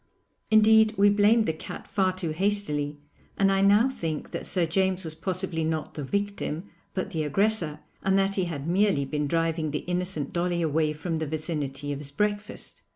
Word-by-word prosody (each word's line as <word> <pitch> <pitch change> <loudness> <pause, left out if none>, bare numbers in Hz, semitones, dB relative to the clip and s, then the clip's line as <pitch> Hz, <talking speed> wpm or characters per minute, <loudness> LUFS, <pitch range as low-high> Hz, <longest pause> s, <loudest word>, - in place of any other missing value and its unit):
Indeed, 220 0 +5
we 200 +1 +5
blamed 210 +2 +4
the 160 - 0
cat 155 - -8
far 190 -2 +1
too 180 -3 -3
hastily, 155 -5 0 0.4
and 195 0 +3
I 195 0 +2
now 205 +5 +5
think 165 - -4
that - - -4
Sir 180 -3 +4
James 190 +2 0
was 160 - -5
possibly 175 0 -2
not 160 -1 -2
the 150 - -5
victim, 200 -1 -2 0.3
but 190 +1 -2
the 160 -4 -2
aggressor, 170 0 +1 0.2
and 195 0 +2
that 195 0 +2
he 190 -2 0
had 155 -4 -5
merely 185 -5 +2
been 150 +1 -2
driving 165 0 0
the 150 +1 -4
innocent 180 -4 -2
Dolly 175 -1 0
away 155 0 +1
from 160 +1 -3
the 160 - -2
vicinity 145 -2 -3
of 140 - -3
his 145 -1 -7
breakfast. 205 +7 -3
175 Hz, 185 wpm, -26 LUFS, 155-200 Hz, 0.4 s, Indeed